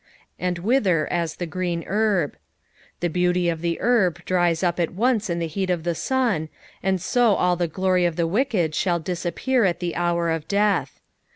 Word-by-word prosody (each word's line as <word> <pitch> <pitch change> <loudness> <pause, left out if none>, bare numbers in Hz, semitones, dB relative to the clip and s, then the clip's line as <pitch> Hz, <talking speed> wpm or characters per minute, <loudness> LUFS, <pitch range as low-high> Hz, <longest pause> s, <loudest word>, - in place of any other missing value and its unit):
" - - -41
And 175 - -3
wither 185 - +2
as 170 -2 -1
t' 175 - -4
e - - -8
grem 175 -1 -2
ierb." 205 -7 +1 0.7
The 175 - +1
beauty 180 +1 +1
of 165 -1 -3
the 170 -1 -1
herb 190 -8 +1
dries 175 -2 +1
up 175 -1 0
at 170 0 -1
once 225 -1 +1
in 170 - -1
the 170 - -1
heat 185 +4 -3
of 175 -3 0
the 170 0 0
sun, 225 -6 0 0.3
and 190 0 +1
so 230 +2 +2
alt 180 -1 +1
the 175 - +1
glory 185 +2 +1
of 170 -2 0
the 170 0 +1
wicked 185 - 0
shall 175 +1 +1
disappear 180 +9 -1
at 180 -3 +1
the 175 -1 -3
hour 170 -1 0
of 160 -2 -3
death. 205 0 +1
180 Hz, 200 wpm, -23 LUFS, 170-195 Hz, 0.7 s, wither